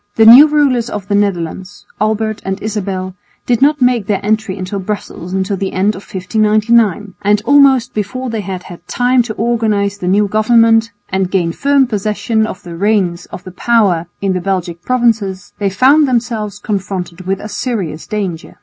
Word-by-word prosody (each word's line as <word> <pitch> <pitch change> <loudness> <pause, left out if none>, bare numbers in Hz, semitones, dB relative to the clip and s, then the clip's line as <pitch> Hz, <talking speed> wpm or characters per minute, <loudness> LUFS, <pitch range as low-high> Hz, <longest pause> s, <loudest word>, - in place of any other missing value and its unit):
The 225 - +4
new 250 +7 +10
rulers 275 -6 +1
of 200 -2 -6
the - - 0
Netherlands, 195 0 -2 0.2
Albert 215 0 -1
and 190 +1 -3
Isabel, 195 -3 -4 0.3
did 240 -1 0
not 290 -1 +3
make 245 -5 +1
their 205 -2 0
entry 215 -2 -1
into 190 +2 -4
Brussels 190 -3 -6
until 190 +1 -1
the 195 0 -3
end 190 +2 +1
of 190 - -9
1599; 210 +1 +1
and 205 +1 +2
almost 270 -4 +4
before 250 +4 -4
they 225 -2 -3
had 185 -2 -6
had 175 -2 -12
time 250 +1 +2
to 225 -2 -5
organise 215 -3 0
the 180 - -4
new 205 +3 +2
government 225 +1 +3 0.2
and 190 -1 -1
gain 180 -3 0
firm 280 +6 +2
possession 220 0 -1
of 190 - -8
the 170 -1 -8
reins 190 -2 0
of - - -10
power 200 -9 +1 0.2
in 195 -1 +1
the 180 - -2
Belgic 175 -3 -3
provinces, 220 -5 -1
they 200 -1 0
found 275 +9 +4
themselves 230 -5 -2
confronted 190 -4 -5
with 195 0 -1
a 210 - -7
serious 200 - -4
danger. 190 -6 -4
210 Hz, 175 wpm, -15 LUFS, 190-230 Hz, 0.3 s, new